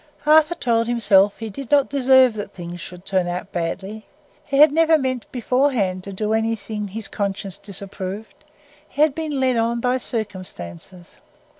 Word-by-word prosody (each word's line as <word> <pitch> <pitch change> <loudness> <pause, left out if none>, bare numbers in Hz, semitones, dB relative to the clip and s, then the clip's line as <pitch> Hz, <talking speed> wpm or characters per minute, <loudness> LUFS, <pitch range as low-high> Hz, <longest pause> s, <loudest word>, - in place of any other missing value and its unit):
Arthur 310 +2 +5
told 230 -4 +1
himself 205 -4 +3
he 225 -1 -6
did 270 +4 -8
not 285 -2 +4
deserve 260 -3 +4
that 205 -2 -6
things 175 -2 -8
should 180 +1 -9
turn 185 -2 0
out 180 +3 -4
badly. 195 +5 -4 0.4
He 275 -1 -1
had 300 +1 +8
never 325 +1 +4
meant 260 -4 -3
beforehand 245 -7 0
to 200 - -6
do 210 +3 -2
anything 220 -1 -2
his 215 +2 -6
conscience 200 -1 -4
disapproved; 200 +1 -8 0.5
he 295 - +2
had 305 -3 +3
been 305 -2 -3
led 255 -2 +2
on 230 +1 0
by 250 +2 0
circumstances. 185 - -7
220 Hz, 160 wpm, -21 LUFS, 195-260 Hz, 0.5 s, had